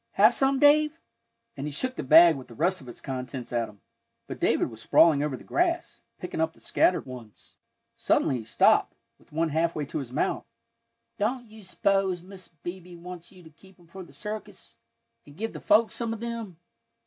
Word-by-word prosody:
"Have - - +6
some, 270 0 +2
Dave?" 300 +2 +4 0.6
and 140 +1 -5
he - - -4
shook 255 - -2
the - - -4
bag 165 +4 +7
with 130 -2 -9
the 115 - -13
rest 180 +5 0
of 130 - -12
its 120 - -10
contents 125 -2 -6
at 120 -1 0
him. 105 -3 -18 0.4
But - - -8
David - - +1
was 110 0 -10
sprawling 155 +3 +5
over 145 -3 -2
the - - -14
grass, 345 -1 -1 0.2
picking 180 -3 -4
up 160 0 0
the - - -23
scattered 180 - +1
ones. 125 -5 -12 0.4
Suddenly 130 - +1
he - - -8
stopped, 110 - +3 0.2
with - - -26
one 160 +2 0
halfway 160 -1 0
to 140 - -4
his 130 -4 -7
mouth. 135 - -1 0.7
"Don't 240 +4 -1
you 220 -1 -14
s'pose 190 -1 0
Mrs. 190 -1 -12
Beebe 175 0 -7
wants 175 0 -10
you 185 -2 -16
to 160 - -15
keep 190 +4 -20
'em 175 - -20
for 190 +3 -11
the 175 - -12
circus, 215 0 -8 0.5
and 145 +1 -15
give 225 +3 -4
the - - -7
folks 220 +2 +3
some 230 -1 -2
of 225 - -7
them?" 230 -6 -5
175 Hz, 200 wpm, -27 LUFS, 145-215 Hz, 0.7 s, bag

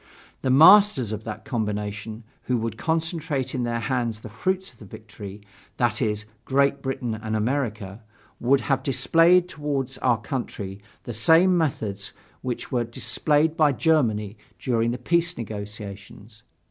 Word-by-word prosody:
The 130 - -1
masters 155 - +7
of 110 0 -5
that 110 - -6
combination, 105 -1 -3 0.2
who 125 - +1
would 115 -1 -3
concentrate 160 -3 -2
in 125 - -1
their 120 -1 -1
hands 120 -3 -2
the 110 - -9
fruits 185 - -2
of 115 - -26
the - - -11
victory, 105 -1 -10 0.4
that 120 0 +1
is, 105 -2 -1 0.2
Great 140 +1 +2
Britain 130 -3 -3
and 110 0 -4
America, 110 -4 -2 0.4
would 135 +3 +3
have 135 - 0
displayed 170 +6 +4
toward 140 -5 -3
our 120 -4 +2
country 100 -5 -5 0.2
the 120 - -6
same 165 +11 +5
methods 110 - -2 0.3
which 125 +1 -5
were 125 -3 +1
displayed 150 +6 0
by 150 -3 +4
Germany 115 - +1 0.2
during 115 -3 0
the 120 - -2
peace 170 +6 0
negotiations. 105 0 -8
120 Hz, 145 wpm, -24 LUFS, 110-145 Hz, 0.4 s, masters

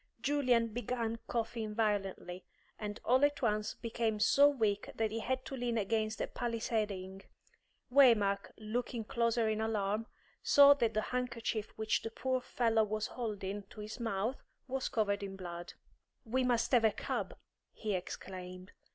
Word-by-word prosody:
Julian 250 -4 +2
began 230 0 -2
coughing 225 -2 -2
violently, 195 -4 -1 0.4
and 210 -1 -5
all 255 +3 +4
at 290 -2 +2
once 215 -1 0
became 225 -2 -2
so 280 +7 +6
weak 215 -7 0
that 220 -1 0
he 225 - -2
had 255 +3 -2
to 270 - -5
lean 240 -2 -1
against 215 +1 0
a - - 0
palisading. 215 -5 -2 0.7
Waymark, 210 -7 +5
looking 230 +2 -3
closer 230 0 +1
in 215 0 0
alarm, 215 0 -1 0.3
saw 285 0 +8
that 230 -6 0
the 215 - +2
handkerchief 235 -3 -2
which 220 0 0
the 225 - -4
poor 255 +3 -1
fellow 230 -3 +2
was 215 0 -2
holding 205 -4 -4
to - - -12
his 210 +3 -7
mouth 225 +2 -2 0.3
was 265 0 -2
covered 205 -2 0
with 195 -1 -6
blood. 175 -2 -7 0.5
"We 255 +3 +1
must 235 -2 +1
have 245 -3 +5
a 220 - +5
cab," - - -3 0.3
he 215 -2 -3
exclaimed. 185 0 -6
225 Hz, 150 wpm, -34 LUFS, 210-240 Hz, 0.7 s, saw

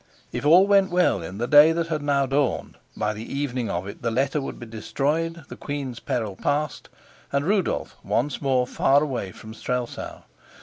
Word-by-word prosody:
If 145 - -2
all 175 +5 +7
went 200 -1 +4
well 175 - +2
in 85 +4 -7
the 120 - -1
day 150 +4 +7
that 165 0 -2
had 155 -2 -1
now 140 -1 +2
dawned, 135 0 -1 0.2
by 105 0 0
the 105 +1 -7
evening 130 -4 -2
of 90 +2 -2
it 100 - -9
the 120 - 0
letter 135 +5 0
would 135 - -6
be 120 - -8
destroyed, 150 +8 -2
the - - -9
queen's 140 -4 -5
peril 110 -5 -2
past, 145 +5 -2 0.4
and 140 +1 0
Rudolf 195 0 0
once 130 +3 -1
more 130 -3 +2
far 140 +3 +3
away 125 -10 -3
from 110 +4 -11
Strelsau. 125 +2 -4
140 Hz, 185 wpm, -24 LUFS, 120-150 Hz, 0.4 s, all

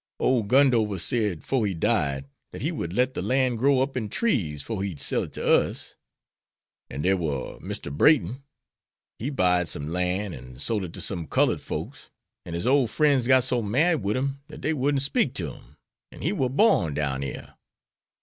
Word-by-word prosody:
Ole 125 -4 +2
Gundover 115 -5 +3
said, 105 -4 -1
'fore 125 -6 0
he 95 - -2
died, 80 -8 0 0.3
dat - - -7
he - - 0
would 85 - -4
let 125 +6 +1
de - - -3
lan' 130 -1 +1
grow 130 +3 +3
up 135 0 -5
in 110 -5 -2
trees 90 - 0
'fore 110 -4 -4
he'd 95 -7 -4
sell 70 - +1
it - - -7
to - - -4
us. - - +1 0.9
An' 70 +3 -5
dere 95 +2 +3
war 75 -7 -3
Mr. 70 - -5
Brayton; 135 - +3 0.8
he 125 - -2
buyed 90 - +2
some 75 -1 -4
lan' 90 +3 -1
and 65 -1 -11
sole 105 +5 0
it 85 - -9
to - - -6
some 85 -6 -3
cullud - - +2
folks, - - -6 0.4
an' 85 - -5
his 85 - -3
ole 135 0 +4
frien's 140 -1 +2
got 130 -1 +6
so 125 -1 +1
mad 145 +9 +2
wid 100 +4 -1
him 140 +1 -2
dat 150 - -10
dey 160 - 0
wouldn't 140 -1 +1
speak 145 - +1
ter 80 -7 -2
him, - - -18 0.3
an' - - -11
he - - +1
war 130 - 0
borned 125 - +3
down 70 -3 -1
yere. 70 - -6
110 Hz, 195 wpm, -25 LUFS, 85-130 Hz, 0.9 s, got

